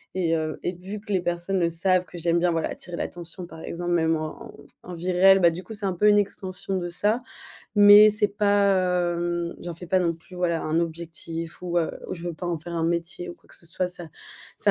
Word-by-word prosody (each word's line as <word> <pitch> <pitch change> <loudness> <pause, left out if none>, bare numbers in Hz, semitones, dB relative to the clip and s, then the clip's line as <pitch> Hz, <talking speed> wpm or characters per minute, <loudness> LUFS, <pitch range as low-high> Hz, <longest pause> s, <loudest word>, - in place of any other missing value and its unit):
et 170 -3 +1
heu 155 -1 -3
et 180 - -1
vu 190 +4 -7
que 210 - -9
les 190 - +3
personnes 175 +2 -1
le 170 - +2
savent 180 +2 +1
que 175 - -11
j'aime 170 0 +1
bien, 175 0 +2
voilà 165 -1 -1
attirer 175 -1 -7
l'attention 175 +1 -6
par 160 - -12
exemple, 175 +1 -4
même 160 -1 +2
en 155 0 -6 0.3
en 180 - -8
vie 180 +2 -2
réelle, 190 +2 +6
bah, 170 -2 +6
du 170 +2 -5
coup 220 - -10
c'est 205 -1 -6
un 190 - 0
peu 210 +4 +2
une 205 0 +6
extension 190 -1 -2
de 175 -1 -3
ça. 210 +7 0 0.6
Mais 205 +1 +9
c'est 210 0 +2
pas, 200 -1 +3 0.4
hem, 175 0 -2
j'en 175 - -5
fais 175 +2 -10
pas 185 +2 +2
non 170 -2 +1
plus, 165 +3 -16
voilà 170 -2 0
un 160 +2 +1
objectif 165 0 -5
ou, 175 -1 0
heu, 165 - -1 0.2
ou - - -3
je 170 - -10
veux 170 -2 -3
pas 175 - -6
en 170 -2 -1
faire 170 +2 -8
un 165 - -1
métier 170 +1 -2
ou - - -7
quoi - - -28
que - - -14
ce 170 - -13
soit 180 +2 -2
ça. 180 -1 -7 0.5
Ça - - +2
175 Hz, 250 wpm, -25 LUFS, 170-190 Hz, 0.6 s, Mais